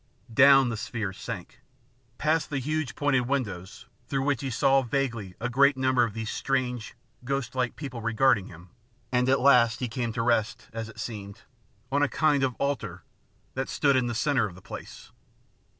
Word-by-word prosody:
Down 135 +1 +7
the 115 - -3
sphere 105 -3 -4
sank, - - -8 0.6
past 155 +1 +1
the 145 - -2
huge 150 +1 -2
pointed 135 -4 +1
windows, 105 -10 -3 0.2
through 135 -1 -1
which 140 -3 0
he 135 - -3
saw 135 +3 +3
vaguely 120 -7 -2
a 120 - -1
great 140 +3 +4
number 130 -1 +3
of 115 -2 -2
these 110 -1 -3
strange, 125 -4 -2 0.3
ghostlike 130 -1 -2
people 130 -6 -6
regarding 115 -2 +2
him, 85 +1 -14 0.4
and 125 0 +2
at 135 - +4
last 125 -3 +5
he 125 - -1
came 120 +1 -3
to 115 0 -1
rest, 115 -2 0
as 115 -1 -5
it 110 - -13
seemed, 100 -3 -7 0.5
on 145 +1 +2
a 145 - +3
kind 150 -3 +2
of 130 -3 0
altar 105 -11 -3 0.5
that 130 +1 -3
stood 140 -2 +2
in 130 -2 +2
the 120 - -3
centre 130 -3 +2
of 90 - -11
the 95 - -14
place. - - -10
125 Hz, 180 wpm, -27 LUFS, 115-135 Hz, 0.6 s, Down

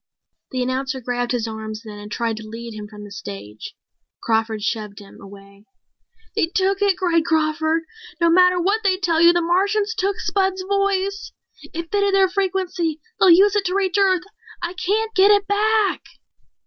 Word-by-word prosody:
The 255 -1 -2
announcer 265 +2 -2
grabbed 245 0 -2
his 235 -2 -1
arms 220 0 -6
then 210 -1 -9
and 210 0 -10
tried 230 -1 -2
to 220 0 -9
lead 230 +1 -8
him 210 -1 -8
from 210 0 -11
the 205 - -11
stage. 105 - -9 0.5
Crawford 220 -2 0
shoved 210 -2 -3
him 200 -1 -13
away. 200 +1 -14 0.7
"They 405 -7 +2
took 385 +3 0
it," 400 -3 +2
cried 345 -3 +1
Crawford. 315 0 0 0.4
"No 335 -1 +3
matter 360 +1 +5
what 400 +5 +1
they 380 -2 +2
tell 340 -4 +1
you, 340 0 +8
the 345 0 +1
Martians 405 +5 +1
took 395 +1 -1
Spud's 380 -1 0
voice. 395 0 -1 0.4
It 335 0 -6
fitted 400 -1 +2
their 385 -1 +4
frequency. 365 -4 -1 0.2
They'll 375 - +6
use 390 +4 +6
it 415 - +2
to 365 +1 -1
reach 390 0 +1
Earth! 375 -3 +3 0.4
I 345 +1 -4
can't 425 +5 -1
get 390 -1 +5
it 405 -1 +4
back!" 420 +1 +1
345 Hz, 175 wpm, -21 LUFS, -, 0.7 s, you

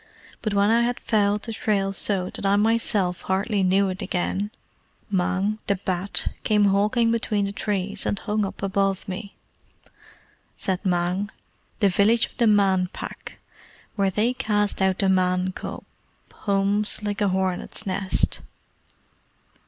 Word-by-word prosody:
But 215 -3 -2
when 200 +2 +4
I 230 +1 +4
had 240 +1 0
fouled 205 -2 +1
the 225 - -4
trail 200 -2 0
so 190 -2 0
that - - -9
I 195 0 +3
myself 210 -4 +1
hardly 195 +2 0
knew 190 +1 +3
it 185 0 -5
again, 190 +3 -1 0.6
Mang, 190 +3 0
the 200 - +2
Bat, 185 +1 -2
came 210 -1 +3
hawking 210 +4 +3
between 215 -3 0
the 200 - -3
trees, 200 -1 -3
and 205 - 0
hung 210 +1 -1
up 195 - -5
above 195 -1 0
me." 200 +2 -6 1.2
Said 190 -1 -2
Mang, 180 +2 0 0.5
"The 200 - +5
village 210 +5 +4
of - - -17
the 235 -2 +3
Man 195 -3 +3
Pack, - - -8 0.6
where 200 -2 +2
they 215 +6 +1
cast 210 -4 0
out 190 -1 +2
the 195 - +1
Man 185 0 +2
cub, - - -7 0.5
hums 200 +1 0
like 205 0 -2
a 205 - +3
hornet's 190 +2 -1
nest." 190 0 0
200 Hz, 145 wpm, -24 LUFS, 190-210 Hz, 1.2 s, The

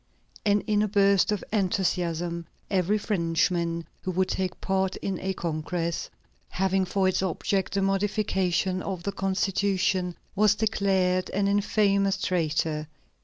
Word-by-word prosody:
And 205 0 +2
in 210 -1 +2
a 215 - +2
burst 200 -1 +3
of 210 - -1
enthusiasm, 175 -4 0 0.2
every 195 +2 +2
Frenchman 170 -3 0 0.2
who - - -4
would 185 +1 +1
take 185 -1 -2
part 190 0 0
in 190 -2 -3
a 190 0 -2
congress 170 +1 -2 0.4
having 190 0 +1
for 190 +1 +1
its 185 - +1
object 190 +1 -1
the 195 - +2
modification 195 -2 0
of 185 -3 -4
the 200 - -1
Constitution, 190 -1 0 0.2
was 210 0 +4
declared 190 -4 +1
an 200 +1 0
infamous 200 -1 +2
traitor. 155 -4 0
190 Hz, 130 wpm, -27 LUFS, 180-200 Hz, 0.4 s, was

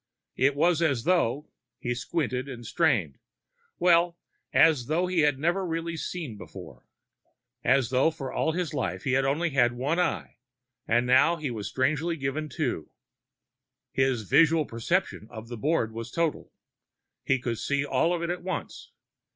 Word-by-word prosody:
It 135 +2 +2
was 170 +2 +2
as 140 -8 +1
though 150 -5 +1 0.3
he 120 -1 -2
squinted 130 0 -2
and 120 -3 -8
strained 110 - +1 0.6
well, 175 -1 +3 0.3
as 150 -7 +4
though 165 +4 +1
he 180 -1 0
had 145 -3 +3
never 170 +7 0
really 165 -1 -3
seen 155 -8 -5
before. - - -11 0.8
As 130 -1 +3
though 130 +4 +4
for 135 -4 -6
all 160 - 0
his 175 -3 -2
life - - -2
he 135 - 0
had 135 +1 +2
had - - +2
only 155 +1 -1
one 130 +6 +2
eye, 180 - -1 0.5
and 120 +2 +2
now 130 +7 +5
he 150 -6 -4
had 105 -2 -5
strangely 155 +6 0
been 155 - -14
given 150 +3 -2
two. 130 - -3 1.0
His 130 -4 +1
visual 160 - +4
perception 115 - -2
of 115 -1 -9
the 120 - -6
board 140 -3 0
was 115 +1 -6
total. 165 +3 -2 0.7
He 135 - +2
could 120 -2 -3
see 140 0 0
all 165 +3 +1
of 175 -1 -1
it 170 - -1
at 180 - -4
once. 185 -3 -5
145 Hz, 165 wpm, -27 LUFS, 125-165 Hz, 1.0 s, now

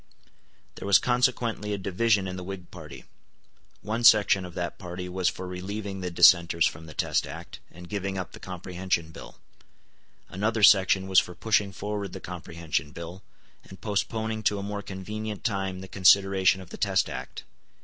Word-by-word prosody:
There - - -6
was 100 - +7
consequently 120 -4 0
a - - -1
division 100 +1 +1
in 90 - -5
the 90 - -6
Whig 95 -1 -8
party. 80 -4 -11 0.8
One 115 +3 -2
section 100 -4 +6
of 90 - -11
that 85 -1 -4
party 90 0 -6
was 90 0 0
for 95 - -7
relieving 95 +2 -5
the 90 - -3
dissenters 85 -1 +5
from 80 +1 -3
the 80 - -11
Test - - 0
Act, - - -9
and 90 +1 -12
giving 95 +1 -3
up 95 - -5
the - - -12
Comprehension 90 -2 -3
Bill. - - -11 0.9
Another 110 +3 -1
section 95 -2 +6
was 95 -1 +6
for 90 - -5
pushing 105 -2 +1
forward 105 -2 -5
the - - -6
Comprehension 85 -4 -4
Bill, 85 +4 -9 0.4
and 95 - -13
postponing 110 +2 -2
to 105 -1 +1
a 100 - -4
more 105 0 -4
convenient 105 +2 -6
time 95 -4 -2
the 95 - -8
consideration 95 0 +4
of 95 - -13
the - - -7
Test - - +1
Act. - - -7
95 Hz, 170 wpm, -27 LUFS, 90-105 Hz, 0.9 s, was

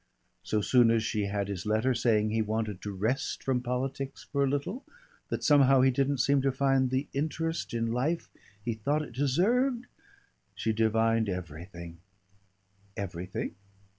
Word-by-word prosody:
So 105 - 0
soon 120 +2 +5
as 115 -1 +2
she 105 -2 -1
had 100 0 -2
his 100 -1 -5
letter 110 +5 +2
saying 110 -3 +2
he 110 0 +1
wanted 110 -3 -2
to 105 - -4
rest 110 +7 -2
from 130 -2 0
politics 130 +2 -3
for 140 -1 +2
a 135 - +2
little, 145 - -2 0.5
that - - -3
somehow 135 -3 +6
he 130 0 +5
didn't 140 +2 +1
seem 140 +3 +3
to 135 0 +2
find 135 -1 +2
the 130 +3 -1
interest 160 +3 -2
in 115 0 0
life 145 +8 -1 0.4
he 115 - 0
thought 145 +8 0
it 135 - -10
deserved, 230 - +1 0.7
she 110 - -1
divined 110 0 +2
everything 85 -1 -7 0.5
" 100 +1 -32
"Everything? 90 -2 -4
120 Hz, 160 wpm, -29 LUFS, 105-140 Hz, 0.7 s, somehow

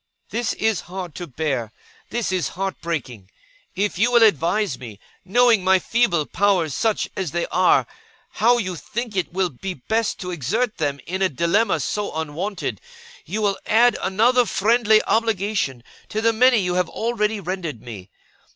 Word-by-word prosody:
'This 235 0 -1
is 220 -3 0
hard 180 -3 -6
to 175 - -7
bear. 130 -6 -2 0.4
This 235 -4 -2
is 185 -2 0
heart 195 0 -3
breaking. 125 - -5 0.5
If 200 -1 -1
you 235 +3 +3
will 235 -1 +6
advise 175 - +2
me, 110 -6 -10 0.2
knowing 230 +1 +4
my 190 0 +5
feeble 185 -6 +1
powers 185 -6 +1
such 220 +6 0
as 190 -4 -2
they 175 +3 -1
are, 185 0 +4 0.5
how 240 +2 +3
you 185 -6 -2
think 230 +6 -5
it 180 -5 -1
will 185 0 0
be 180 +8 -6
best 220 - -1
to 180 -1 -4
exert 210 - -1
them 145 -3 -1
in 185 +3 -4
a 190 - +3
dilemma 170 - +1
so 210 -1 -3
unwonted, 160 +6 -4 0.5
you 215 +1 -2
will 200 -1 +1
add 235 +2 +4
another 235 +5 +3
friendly 220 +1 +3
obligation 205 - 0 0.3
to 215 - -2
the 230 +1 +2
many 250 +2 +5
you 180 -4 0
have 180 -1 0
already 220 -2 -1
rendered 175 - -4
me. 105 -5 -10
190 Hz, 165 wpm, -22 LUFS, 170-220 Hz, 0.5 s, will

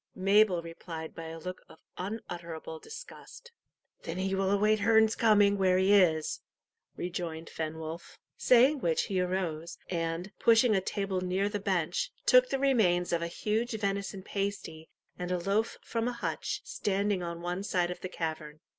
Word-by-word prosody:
Mabel 195 -2 +4
replied 165 -1 -7
by 165 - -8
a 165 0 -7
look 180 +3 -7
of - - -15 0.2
unutterable 175 -6 -6
disgust. 480 - -11 0.5
"Then 165 +1 -5
he 190 +1 -1
will 190 0 +1
await 210 +2 +3
Herne's 220 +1 +4
coming 205 -3 +4
where 185 -1 +4
he 190 +2 +4
is," 165 -6 +3 0.5
rejoined 170 -3 -5
Fenwolf. 160 +1 -6 0.2
Saying 260 +4 +5
which 165 -8 +1
he 190 -2 -1
arose, 175 -3 -2
and, 165 +2 -2
pushing 230 -1 +5
a 190 - +2
table 195 -1 -2
near 185 +2 0
the 205 - -3
bench, 195 - -1
took - - +6
the - - 0
remains 210 -11 +2
of 170 - +1
a 170 - -1
huge 220 +7 -1
venison 200 -2 -2
pasty 195 -6 -4 0.3
and 180 0 -3
a 180 - +1
loaf 200 +5 0
from 230 0 -2
a 245 - -1
hutch 235 - -3
standing 200 -1 -1
on 170 -1 -5
one 175 +2 -3
side 180 -3 0
of 180 - -7
the 185 - -5
cavern. 155 -3 -5
190 Hz, 165 wpm, -30 LUFS, 170-210 Hz, 0.5 s, took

